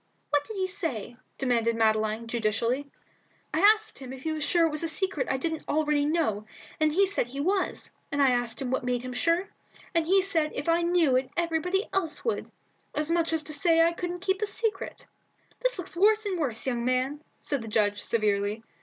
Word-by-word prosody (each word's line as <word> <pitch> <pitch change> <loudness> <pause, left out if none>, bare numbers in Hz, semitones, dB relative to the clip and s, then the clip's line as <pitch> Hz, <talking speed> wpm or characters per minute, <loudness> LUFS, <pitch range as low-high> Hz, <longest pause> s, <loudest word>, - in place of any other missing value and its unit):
"What 290 -1 +3
did 440 - -7
he 380 - +1
say?" 325 - -4 0.2
demanded 235 -3 +1
Madeline, 220 0 +1
judicially. 230 +4 0 0.7
"I - - +1
asked 435 +1 +4
him 260 -2 -8
if 265 0 -9
he 320 - -1
was 310 -1 -2
sure 335 +3 +3
it 325 - 0
was 300 - 0
a 335 - 0
secret 325 -2 -1
that - - 0
I - - 0
didn't 320 +3 -3
know - - -1
already, 300 -1 +2 0.7
and 310 0 +3
he 390 +6 +4
said 385 -10 -1
he 270 +3 -7
was; 375 +6 -1 0.2
and 285 - -1
I 275 -2 +5
asked 245 -1 -1
him 260 -3 -3
what 260 - 0
made 250 -1 -1
him 255 0 -5
sure, 335 +9 +1 0.4
and 330 -2 +1
he 385 +1 +4
said 325 -6 +1
because - - -2
if 295 - -3
I 335 +1 +3
knew 340 -6 +3
it 255 0 -1
everybody 345 +4 0
else 325 -6 -1
would. 460 - -1 0.5
As 300 +2 0
much 335 -1 +1
as 320 -1 +1
to 305 - -3
say 330 +2 +4
I 335 +1 +3
couldn't 355 +1 -4
keep 380 +1 0
a 425 - +1
secret." 420 -1 -2 0.6
"This - - +1
looks 360 -2 -6
worse 425 +4 +4
and 380 -4 -1
worse, 245 -8 -2
young 240 -3 -1
man," 255 +3 0 0.2
said 280 -4 -1
the 225 - -7
judge, 205 -1 +1
severely. 210 0 0
305 Hz, 215 wpm, -27 LUFS, 250-355 Hz, 0.7 s, I